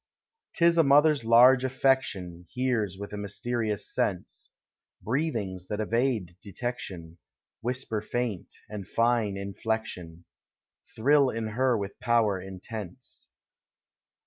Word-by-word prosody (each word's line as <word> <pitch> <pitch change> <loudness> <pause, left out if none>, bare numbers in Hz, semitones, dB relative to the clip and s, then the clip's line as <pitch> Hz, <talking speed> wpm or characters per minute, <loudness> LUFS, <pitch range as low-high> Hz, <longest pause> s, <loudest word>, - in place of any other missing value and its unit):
'T 170 - +3
is 170 0 +5
a - - +7
mother's 145 0 +5
large 125 +3 +6
affection 130 -10 0
Hears 120 -7 0
with 100 +1 -7
a 105 - -4
mysterious 105 +1 -2
sense, - - -2 0.3
— - - -56
Breathings 110 - -2
that 105 - -3
evade 110 -5 0
detection, 95 -6 -6 0.4
Whisper 120 -3 -2
faint, 115 -4 -3 0.2
and 105 -3 -7
fine 115 -3 +1
iulleetion. 100 -4 -4 0.7
Thrill 140 +3 +4
in 115 -2 -3
her 125 +2 +2
with 100 -1 -6
power 115 -6 +2
intense. 95 +4 -8
110 Hz, 115 wpm, -28 LUFS, 100-125 Hz, 0.7 s, a